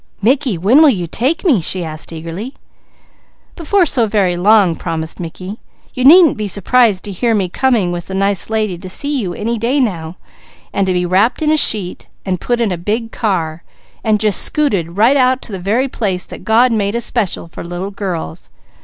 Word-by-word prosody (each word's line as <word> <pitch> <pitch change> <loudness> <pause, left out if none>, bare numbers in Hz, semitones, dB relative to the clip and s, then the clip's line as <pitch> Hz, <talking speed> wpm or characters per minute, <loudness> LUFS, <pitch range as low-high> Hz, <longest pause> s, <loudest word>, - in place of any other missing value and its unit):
"Mickey, 250 -1 +1
when 215 - +4
will 310 - +7
you 185 -9 -1
take 265 - -2
me?" 265 - +3
she 180 +3 -2
asked 155 +1 -7
eagerly. 165 - -7 1.0
"Before 360 +3 +1
so 245 -7 +1
very 195 -4 +1
long," 195 0 +4
promised 160 -1 -5
Mickey. 185 +5 -7 0.3
"You 255 - -3
needn't 320 +1 +7
be 210 -1 -3
surprised 205 +1 +2
to 205 - -5
hear 225 +4 0
me 195 -3 0
coming 225 -4 +1
with 175 -1 -5
the 190 - -5
nice 195 0 0
lady 215 -5 -2
to 185 - -9
see 285 +8 0
you 180 -4 -4
any 230 +2 -3
day 245 +6 0
now, 175 -8 -2 0.6
and 195 -1 0
to 185 - +1
be 180 0 0
wrapped 195 - +1
in 305 - +2
a - - +4
sheet, 205 -10 +2 0.2
and 185 -3 -2
put 240 -1 -1
in 230 -4 0
a 175 - -3
big 225 +5 -3
car, 170 -7 -2 0.4
and 215 -2 +1
just 210 -2 +2
scooted 195 - 0
right 240 +7 +4
out 255 -1 +2
to - - -8
the 190 - -5
very 220 +9 0
place 195 -8 -2
that - - -11
God 235 +4 +4
made 205 -1 -1
especial 235 -7 -1
for 165 - -9
little 175 +3 -5
girls. 170 - -5
205 Hz, 200 wpm, -15 LUFS, 180-240 Hz, 1.0 s, will